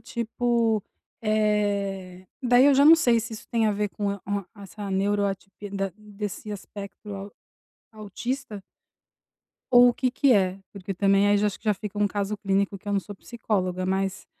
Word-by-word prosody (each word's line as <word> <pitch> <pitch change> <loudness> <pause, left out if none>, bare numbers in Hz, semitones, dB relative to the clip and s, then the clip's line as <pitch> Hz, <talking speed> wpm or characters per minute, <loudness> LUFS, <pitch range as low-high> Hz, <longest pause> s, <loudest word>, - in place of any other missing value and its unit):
tipo, 235 -2 0 0.4
eh, 200 -4 -1
daí 250 +1 +5
eu 285 - +6
já 280 +2 +5
não 320 +2 +10
sei 245 -8 +3
se 225 0 -5
isso 220 - -9
tem 225 -2 +2
a 210 - +2
ver 205 0 -1
com 205 0 -3
a 200 -1 -5
o 200 +1 -1 0.2
a 200 - -13
essa 200 +1 -8
neuroatipi 200 0 -1
da 195 -2 -2
desse 210 0 -6
aspecto 200 +1 -9
au 195 +1 -7 0.6
autista 215 +1 -5 1.1
ou 245 0 +8
o 240 - +1
que 255 -1 0
que 270 0 +3
é. 190 -2 +2
Porque 195 -1 -6
também 195 +1 +3
aí, 205 - +4
já 210 - +2
acho 205 - -3
que - - -28
já 210 -1 +3
fica 205 +1 -7
um 205 - +3
caso 205 +1 -2
clínico, 195 0 0
que 205 - -10
eu - - 0
não 200 - +2
sou 205 +2 -10
psicóloga, 185 -5 -2
mas 190 +2 -1
205 Hz, 185 wpm, -25 LUFS, 195-220 Hz, 1.1 s, não